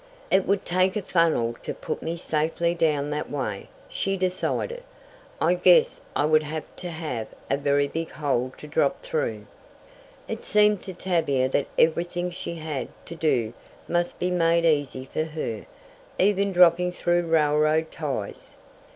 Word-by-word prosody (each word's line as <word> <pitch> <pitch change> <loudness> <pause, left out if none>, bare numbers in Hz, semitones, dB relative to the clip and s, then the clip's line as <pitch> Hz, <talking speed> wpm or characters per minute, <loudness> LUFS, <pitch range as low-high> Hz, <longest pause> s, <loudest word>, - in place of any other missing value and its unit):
"It 190 0 +3
would 200 0 +1
take 185 +1 +2
a 210 - -2
funnel 165 -11 +2
to - - -5
put - - -5
me 165 +1 -3
safely 165 +1 0
down 150 -4 +1
that 150 +1 -3
way," 130 -9 -4 0.2
she 195 0 -2
decided. 185 - -1 0.6
"I 170 +2 +3
guess 180 0 +4
I 145 - +2
would 155 0 +4
have 155 +1 -5
to 180 - -5
have 155 -9 -4 0.2
a - - +4
very 140 0 +2
big 165 +3 -4
hole 130 -4 -1
to - - -10
drop 150 - 0
through." - - -2 0.8
It - - -5
seemed 210 -1 +3
to 190 -2 -6
Tavia 160 -8 +1
that 140 - 0
everything 175 +2 +1
she 170 -1 -5
had 155 -6 -4 0.2
to - - -8
do 125 -9 0 0.3
must 175 0 0
be 180 0 -1
made 170 -1 +3
easy 145 -5 +1
for 155 +3 -2
her, 150 -9 -5 0.5
even 200 0 +2
dropping 180 0 +5
through 175 -1 +1
railroad 155 0 +2
ties! 135 -10 -5
165 Hz, 155 wpm, -25 LUFS, 150-180 Hz, 0.8 s, dropping